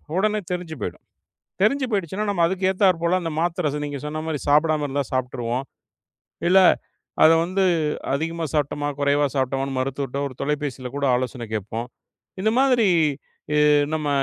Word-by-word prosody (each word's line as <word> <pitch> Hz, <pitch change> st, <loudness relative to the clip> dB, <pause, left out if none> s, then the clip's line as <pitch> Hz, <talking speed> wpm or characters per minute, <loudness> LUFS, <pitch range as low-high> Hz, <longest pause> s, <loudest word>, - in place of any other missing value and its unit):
உடனே 215 Hz, +2 st, +1 dB
தெரிஞ்சு 175 Hz, -3 st, -4 dB
போயிடும். -, -, -5 dB, 0.6 s
தெரிஞ்சு 265 Hz, +6 st, +3 dB
போயிடுச்சுன்னா, 195 Hz, +1 st, -1 dB
நம்ம 175 Hz, -4 st, +1 dB
அதுக்கு 190 Hz, +1 st, -1 dB
ஏத்தாற்போல 185 Hz, -2 st, +2 dB
அந்த 165 Hz, -1 st, -3 dB
மாத்திர 170 Hz, -3 st, 0 dB
நீங்கச் 145 Hz, 0 st, -6 dB
சொன்ன 155 Hz, +1 st, -4 dB
மாதிரி 155 Hz, -3 st, -2 dB
சாப்பிடாம 150 Hz, 0 st, +3 dB
இருந்தா 140 Hz, +1 st, -1 dB
சாப்ட்ருவோம். 125 Hz, -1 st, -2 dB, 0.9 s
இல்ல 190 Hz, +2 st, +6 dB, 0.7 s
அத 160 Hz, -, +8 dB
வந்து 190 Hz, +2 st, 0 dB, 0.5 s
அதிகமா 165 Hz, +3 st, -2 dB
சாப்டோம்மா 145 Hz, -1 st, -1 dB
குறைவா 145 Hz, +1 st, +3 dB
சாப்டோம்மா 135 Hz, 0 st, 0 dB
மருத்துவர்ட்ட 135 Hz, +1 st, -2 dB
ஒரு 130 Hz, -, -12 dB
தொலைபேசியில 140 Hz, -3 st, -2 dB
கூட 140 Hz, -, -1 dB
ஆலோசனை 125 Hz, -1 st, -3 dB
கேட்போம். 110 Hz, +3 st, -4 dB, 0.6 s
இந்த 220 Hz, -, +3 dB
மாதிரி 250 Hz, -6 st, +4 dB, 0.7 s
இ -, -, +3 dB, 0.4 s
நம்ம 155 Hz, -2 st, -2 dB
150 Hz, 140 wpm, -23 LUFS, 135-180 Hz, 0.9 s, அத